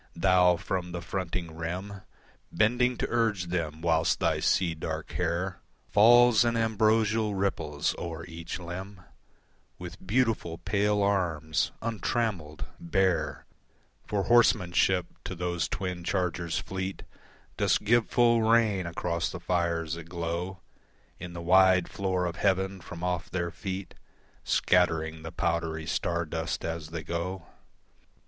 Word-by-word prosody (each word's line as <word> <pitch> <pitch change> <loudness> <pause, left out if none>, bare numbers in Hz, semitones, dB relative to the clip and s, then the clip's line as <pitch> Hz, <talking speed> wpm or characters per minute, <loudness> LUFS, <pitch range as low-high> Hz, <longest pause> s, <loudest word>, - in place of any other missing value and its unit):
Thou 90 -1 +4
from 90 0 -3
the 85 - -4
fronting 85 -3 -4
rim 90 +5 -5 0.5
Bending 125 +3 +2
to - - -1
urge 115 -5 +1
them, 80 -3 -2
whilst 80 -1 +2
thy - - +1
sea 90 -3 +2
dark 80 - -5
hair 90 +2 -2 0.3
Falls 120 +1 +6
in 120 -1 +1
ambrosial 110 -1 +2
ripples 80 -6 -1
o'er 80 -1 -5
each 85 -1 -6
limb, 90 +2 -7 0.8
With 90 0 -9
beautiful 110 -7 +1
pale 105 +1 +1
arms, 85 -6 0
untrammelled, 110 -8 -2
bare 95 - 0 0.6
For 100 -2 0
horsemanship, 95 -6 +3 0.2
to 95 - -5
those 85 -2 -1
twin 90 -2 -4
chargers 90 -2 -1
fleet 95 0 -4 0.5
Dost - - +2
give 115 +2 +3
full 120 -1 +4
rein 110 -5 +3
across 85 0 -2
the 90 - -6
fires 85 -2 -1
that 85 -1 -6
glow 85 +2 -4 0.6
In 90 0 -7
the 85 0 -6
wide 95 0 +5
floor 95 -2 -1
of 85 -1 -3
heaven, 95 -1 0
from 85 0 -9
off 90 -1 -2
their 85 -2 -2
feet 95 +1 -5 0.5
Scattering 80 -2 +2
the 80 +1 -7
powdery 80 -1 -1
star 85 +1 -1
dust 80 +1 -3
as 80 -2 -4
they 80 -1 -5
go. 85 +2 -4
90 Hz, 130 wpm, -28 LUFS, 85-100 Hz, 0.8 s, Falls